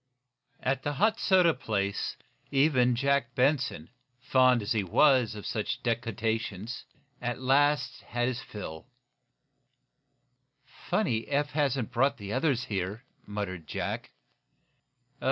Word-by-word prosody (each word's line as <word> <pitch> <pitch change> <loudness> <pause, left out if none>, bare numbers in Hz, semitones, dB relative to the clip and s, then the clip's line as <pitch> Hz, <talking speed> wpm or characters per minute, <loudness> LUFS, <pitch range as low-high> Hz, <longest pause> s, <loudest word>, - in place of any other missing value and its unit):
At 135 0 0
the 145 +1 -2
hot 215 +9 +2
soda 180 -4 +4
place 100 -5 -2 0.3
even 135 -3 +3
Jack 135 -1 +1
Benson, 130 - +1 0.3
fond 130 -2 +4
as 100 - -4
he 110 -4 +2
was 125 - +4
of 105 - -8
such 105 - -3
decoctions, 115 -2 -2 0.4
at 120 0 -2
last 145 +3 +2
had 120 0 -2
his 125 -1 -2
fill. 80 -5 -8 2.0
"Funny 115 0 +1
Eph 145 +1 0
hasn't 135 -5 0
brought 130 +4 +2
the 100 0 -6
others 130 -2 +1
here," 100 +3 -3 0.2
muttered 100 -5 -5
Jack. - - -3
125 Hz, 115 wpm, -29 LUFS, 110-140 Hz, 2.0 s, soda